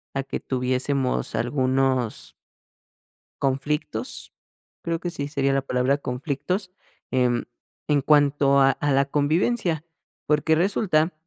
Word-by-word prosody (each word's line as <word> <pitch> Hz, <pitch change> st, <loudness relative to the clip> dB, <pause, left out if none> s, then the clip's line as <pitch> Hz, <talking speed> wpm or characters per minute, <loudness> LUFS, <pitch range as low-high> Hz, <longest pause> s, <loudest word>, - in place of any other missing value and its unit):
a 135 Hz, -, 0 dB
que 135 Hz, -, -4 dB
tuviésemos 130 Hz, +1 st, -1 dB
algunos 130 Hz, -1 st, 0 dB, 1.1 s
conflictos, 135 Hz, -3 st, -2 dB, 0.5 s
creo 165 Hz, -1 st, -1 dB
que 175 Hz, -, -3 dB
sí 145 Hz, -4 st, -4 dB
sería 140 Hz, -1 st, 0 dB
la 135 Hz, -, +2 dB
palabra 130 Hz, +1 st, +1 dB
conflictos, 145 Hz, +8 st, -3 dB, 0.4 s
em, 125 Hz, -2 st, +1 dB, 0.4 s
en 145 Hz, -2 st, +2 dB
cuanto 140 Hz, -1 st, +4 dB
a 135 Hz, 0 st, +6 dB
a 145 Hz, +1 st, -1 dB
la 135 Hz, 0 st, +3 dB
convivencia, 160 Hz, -, 0 dB, 0.4 s
porque 150 Hz, +1 st, +2 dB
resulta 175 Hz, -2 st, +1 dB
140 Hz, 110 wpm, -24 LUFS, 130-155 Hz, 1.1 s, a